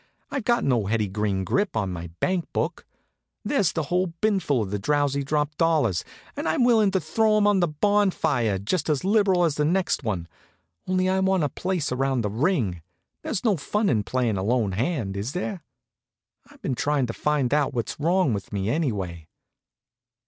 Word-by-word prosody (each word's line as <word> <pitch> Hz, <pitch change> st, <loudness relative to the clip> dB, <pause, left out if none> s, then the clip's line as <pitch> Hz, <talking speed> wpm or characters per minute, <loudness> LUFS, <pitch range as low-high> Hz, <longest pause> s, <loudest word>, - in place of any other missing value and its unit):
"I've 275 Hz, -6 st, -3 dB
got 240 Hz, 0 st, +2 dB
no 120 Hz, -7 st, +1 dB
Hetty 105 Hz, -1 st, 0 dB
Green 100 Hz, -1 st, -1 dB
grip 200 Hz, -, 0 dB
on 100 Hz, -4 st, -1 dB
my 85 Hz, -1 st, -6 dB
bankbook. 185 Hz, -2 st, -1 dB, 0.6 s
There's 205 Hz, -, +2 dB
a 160 Hz, -, +1 dB
whole 180 Hz, +5 st, 0 dB
binful 185 Hz, -, +1 dB
of 95 Hz, -, -6 dB
the 105 Hz, -, -2 dB
'Drowsy 140 Hz, +4 st, +1 dB
Drop' 150 Hz, +1 st, -1 dB
dollars, 155 Hz, -, +2 dB, 0.3 s
and -, -, -2 dB
I'm 160 Hz, +10 st, +2 dB
willing 225 Hz, -4 st, +4 dB
to 190 Hz, 0 st, +1 dB
throw 215 Hz, +7 st, +2 dB
'em 210 Hz, -, +3 dB
on 205 Hz, -2 st, +4 dB
the 175 Hz, -, +3 dB
bonfire 155 Hz, -, +1 dB
just 150 Hz, -, -2 dB
as 150 Hz, -3 st, +1 dB
liberal 195 Hz, -3 st, +3 dB
as 165 Hz, -4 st, +2 dB
the 150 Hz, -, +2 dB
next 175 Hz, -1 st, +1 dB
one, 95 Hz, -7 st, -2 dB, 0.6 s
only 185 Hz, 0 st, +1 dB
I 190 Hz, 0 st, +2 dB
want 190 Hz, -2 st, +2 dB
a 145 Hz, -, +1 dB
place 175 Hz, 0 st, -2 dB
around 135 Hz, 0 st, 0 dB
the 105 Hz, -2 st, -2 dB
ring. 115 Hz, -, 0 dB, 0.4 s
There's 210 Hz, -, -3 dB
no 210 Hz, -5 st, +3 dB
fun 205 Hz, +8 st, 0 dB
in 110 Hz, -5 st, +2 dB
playing 120 Hz, -1 st, -1 dB
a 95 Hz, -, -2 dB
lone 115 Hz, -1 st, +1 dB
hand, 110 Hz, -, -2 dB
is 105 Hz, +8 st, -3 dB
there? 180 Hz, 0 st, -3 dB, 0.9 s
I've -, -, -20 dB
been -, -, -1 dB
trying 145 Hz, +1 st, +1 dB
to 115 Hz, -, -4 dB
find 145 Hz, -2 st, 0 dB
out 145 Hz, -1 st, +2 dB
what's 120 Hz, +2 st, -3 dB
wrong 170 Hz, -3 st, +2 dB
with 100 Hz, -2 st, -5 dB
me, 100 Hz, +1 st, -1 dB
anyway?" 95 Hz, -, -2 dB
145 Hz, 185 wpm, -25 LUFS, -, 0.9 s, willing